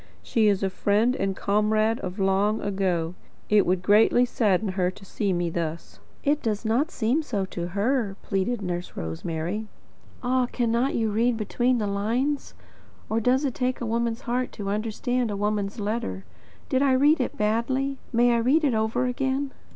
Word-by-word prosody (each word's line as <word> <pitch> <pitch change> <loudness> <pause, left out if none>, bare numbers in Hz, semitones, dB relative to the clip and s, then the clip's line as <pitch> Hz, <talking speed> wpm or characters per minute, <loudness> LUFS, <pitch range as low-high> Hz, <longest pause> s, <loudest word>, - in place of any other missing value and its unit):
She 220 -3 +2
is 200 -1 +2
a 190 - 0
friend 215 +6 +2
and 195 -4 -1
comrade 215 +3 +1
of 185 0 -5
long 195 +2 +2
ago. 185 -4 -1 0.4
It 210 -1 +4
would 180 0 +1
greatly 215 +5 +5
sadden 210 -4 +1
her 185 -1 0
to 195 +1 -12
see 200 +1 -1
me 175 -2 0
thus." 165 0 -4 0.2
"It 295 +1 +2
does 215 -1 -2
not 245 +9 +2
seem 250 +2 0
so 210 -10 -2
to 175 -2 -5
her," 205 +2 0
pleaded 205 +3 -1
Nurse 175 -1 -4
Rosemary. 165 - -3 0.6
"Ah, 250 0 +2
cannot 240 +2 0
you 225 -2 0
read 230 +2 +2
between 245 +4 +1
the 215 - -1
lines? 230 +9 -1 0.6
Or 220 - +2
does 255 +5 +2
it 265 - -1
take 255 +1 -1
a 240 - -3
woman's 230 +1 -1
heart 250 0 -2
to 200 -1 -5
understand 230 +3 -1
a 205 - -3
woman's 205 +1 -1
letter? 205 - -3 0.4
Did 260 -1 +1
I 275 -2 +4
read 285 +3 +4
it 250 - -3
badly? 260 +6 0
May 240 0 +4
I - - +3
read 265 +8 +3
it 275 -5 +2
over 220 +3 0
again?" 265 +2 -1
220 Hz, 175 wpm, -25 LUFS, 195-250 Hz, 0.6 s, greatly